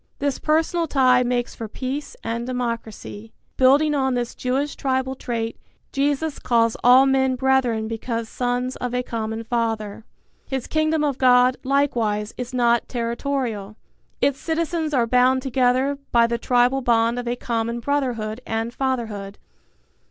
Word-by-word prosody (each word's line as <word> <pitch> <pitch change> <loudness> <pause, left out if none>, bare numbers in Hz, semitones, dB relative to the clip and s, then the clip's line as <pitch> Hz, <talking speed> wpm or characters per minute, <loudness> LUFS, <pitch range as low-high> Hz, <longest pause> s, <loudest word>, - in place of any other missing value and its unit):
This 285 -2 -1
personal 325 +2 +1
tie 255 -3 +4
makes 245 -1 -1
for 225 - -6
peace 265 +6 -5
and 230 +1 -3
democracy. 230 -3 -5 0.2
Building 280 +4 +4
on 265 -3 +1
this 240 -1 -2
Jewish 270 +3 -2
tribal 260 -1 -1
trait, 230 -3 -4 0.3
Jesus 285 +2 -1
calls 230 -2 +2
all 255 +2 +7
men 265 -1 +2
brethren 255 -4 +1
because 230 0 -3
sons 245 +2 -2
of 250 0 -3
a 250 - 0
common 225 -1 -4
Father. 225 -3 -2 0.4
His 265 -2 -3
Kingdom 310 0 +1
of 285 -3 -1
God, 250 0 +5
likewise, 235 -6 0
is 250 0 -5
not 240 -2 +2
territorial. 235 -3 -3 0.5
Its 275 -1 +2
citizens 325 -1 -1
are 250 -5 +2
bound 255 +2 +3
together 265 +2 +1
by 235 -1 +5
the 235 0 -1
tribal 250 +2 +2
bond 235 -1 +2
of 245 - -5
a 240 - 0
common 235 -1 -2
brotherhood 245 -4 -2
and 225 +1 -3
fatherhood. 225 -7 -3
250 Hz, 145 wpm, -22 LUFS, 230-270 Hz, 0.5 s, all